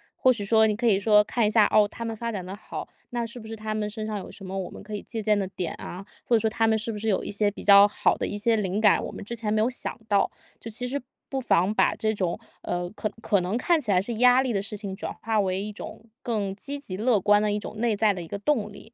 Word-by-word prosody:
或 255 - +4
许 205 -3 -4
说 220 +1 +5
你 210 - 0
可 235 +3 -3
以 195 -3 +4
说 210 0 +5
看 230 +1 0
一 - - +3
下， 215 -1 +5
哦， 210 -1 +5
他 230 - -8
们 225 - -3
发 230 +1 -3
展 190 -4 -4
得 190 +2 -6
好， 210 - -7 0.2
那 240 -1 -1
是 235 +2 -8
不 220 - -10
是 225 - -6
他 215 0 -4
们 210 -1 -1
身 215 +1 -5
上 215 -1 -3
有 - - -9
什 195 - -12
么 190 +1 -6
我 190 - -3
们 - - -10
可 210 0 -6
以 205 - -4
借 225 -2 -5
鉴 210 0 +2
的 195 -2 -1
点 180 -3 -4
啊， 180 +3 -7 0.2
或 235 - +3
者 - - +4
说 220 - +1
他 225 0 +1
们 220 - +3
是 225 +1 -3
不 210 - -5
是 220 +1 -1
有 195 - +1
一 - - -5
些 205 0 +2
比 - - -9
较 200 0 +8
好 - - +1
的 - - -2
一 205 - -4
些 225 +2 +2
灵 200 -1 -1
感 210 - +5
我 - - -5
们 - - -8
之 235 +3 -5
前 220 -2 -2
没 215 - +2
有 225 - +3
想 255 0 -5
到， 200 -1 +3 0.3
就 230 - -7
其 245 +3 -4
实 280 +3 -3 0.3
不 270 -1 -3
妨 195 -3 +2
把 - - +3
这 220 0 0
种， 185 -5 -2 0.2
呃， 175 0 -2
可 215 0 -3
可 200 -4 +2
能 185 +6 -1
看 330 +4 +2
起 220 - -6
来 185 -2 +4
是 230 +5 -3
压 250 +3 +5
力 250 - -1
的 195 - 0
事 210 +1 -6
情 195 -2 -5
转 - - -5
化 225 -1 +1
为 190 -1 0
一 210 - -5
种 225 - -9 0.2
更 205 -5 -2
积 280 +7 -5
极 240 -10 -6
乐 225 -1 +3
观 205 +2 +4
的 210 0 +1
一 205 - 0
种 210 +1 -7
内 230 -3 +1
在 210 0 +3
的 180 - -6
一 165 - -8
个 200 - -4
动 215 -2 0
力。 220 +3 -14
215 Hz, 335 characters per minute, -26 LUFS, 200-225 Hz, 0.3 s, 较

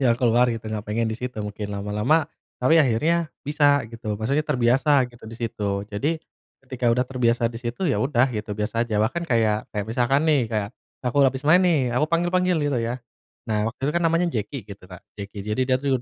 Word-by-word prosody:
jalan 120 -4 +3
keluar 120 0 +3
gitu, 115 -1 -3
gak 105 - -2
pengen 115 +2 0
disitu 120 +3 -4
mungkin 105 0 -5
lama-lama. 105 +10 +1 0.3
Tapi 160 +6 +4
akhirnya 155 +6 +2 0.2
bisa 145 -2 +3
gitu, 115 -2 -5
maksudnya 130 +8 0
terbiasa 130 +1 +3
gitu 120 - -16
disitu. 105 -3 -3
Jadi, 115 +11 -2 0.5
ketika 130 -2 -1
udah 125 +2 +1
terbiasa 120 -2 0
disitu 120 +9 -4
ya 140 - +1
udah 130 -1 +2
gitu 105 -1 -4
biasa 115 +2 -1
aja. 110 - -1
Bahkan 170 +10 -2
kayak 110 -3 +1
kayak 105 -1 -3
misalkan 125 +6 +1
nih, 145 -8 +2
kayak 105 -3 -1 0.4
aku 125 +2 -2
habis 130 +2 -6
main 160 +5 +6
nih, 150 -10 +2
aku 125 +5 +2
panggil-panggil 175 +1 +1 0.2
gitu 125 - +1
ya. 115 +2 -2 0.5
Nah, 105 0 +1
waktu 115 - -10
itu 150 - 0
kan 170 - +1
namanya 165 +2 +2
Jeki 110 +2 -4
gitu, 100 -2 -11
Kak, 90 -2 -11 0.2
Jeki. 100 +1 -8
Jadi 105 +4 -2
dia 130 - +4
tuh 135 -2 0
120 Hz, 195 wpm, -24 LUFS, 110-140 Hz, 0.5 s, main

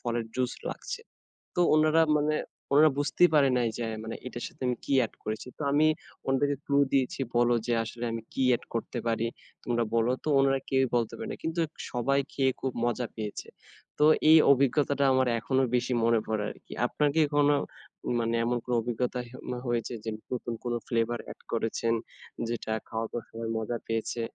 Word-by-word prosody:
ফলের 120 -1 -2
জুস 125 -1 0 0.2
লাগছে।" - - -5 0.6
তো - - 0 0.2
উনারা 155 +1 +4 0.2
মানে 150 +1 +1 0.4
ওনারা 155 +2 +7
বুঝতেই 175 +4 +4
পারে 140 -2 +5
নাই 120 -1 +2
যে - - -4
আ - - -3
মানে 110 - -5
এটার 120 -1 -6
সাথে - - -17
আমি 125 - 0
কি 140 - 0
অ্যাড 115 - 0
করেছি। 110 +3 -4
তো - - -8
আমি 155 +2 +4 0.4
ওনাদেরকে 140 +1 +1
ক্লু 140 - +1 0.2
দিয়েছি 130 -1 +1 0.2
বলো 120 0 +4
যে, 120 - +1
"আসলে 120 +2 -5
আমি 115 0 -3
কি 135 - 0
অ্যাড 120 - +2
করতে 115 +2 -3
পারি 115 0 +1 0.4
তোমরা 120 -1 +1
বলো 115 +2 +3
তো।" - - -6
উনারা 135 0 +3
কেউই 130 -1 +3
বলতে 115 -2 0
পারে 225 -1 -5
না। - - -4
কিন্তু 165 +1 -1 0.3
সবাই 135 +3 +1
খেয়ে 135 -1 +2
খুব 130 - -1
মজা 120 0 0
পেয়েছে। 105 -2 -5 0.5
তো 150 - +6 0.2
এই 160 - +10
অভিজ্ঞতাটা 140 +1 +3
আমার 130 0 +3
এখনো 130 +3 +1
বেশি 125 +1 0
মনে 115 0 +4
পড়ে 110 -1 -1
আরকি। - - -11
আপনার 145 +4 +1
কি 160 - +5
কোনো 145 0 +5 0.6
মানে 115 0 0
এমন 120 +1 +1
কোনো 125 - -1
অভিজ্ঞতা 125 +2 -2
হে 120 - -13
ম - - -1 0.2
হয়েছে 120 0 -1
যে 110 - -3 0.2
নতুন 120 -1 -3
কোনো 120 -1 -1
ফ্লেভার 115 0 0
অ্যাড - - -10
করেছেন, 115 0 0 0.6
যেটা 115 -1 -3 0.2
খাওয়ার 110 0 -3
পর 120 - -3
সবাই 115 0 -5
মজা 110 +2 -2
পেয়েছে? 115 +1 -2
120 Hz, 190 wpm, -28 LUFS, 115-140 Hz, 0.6 s, এই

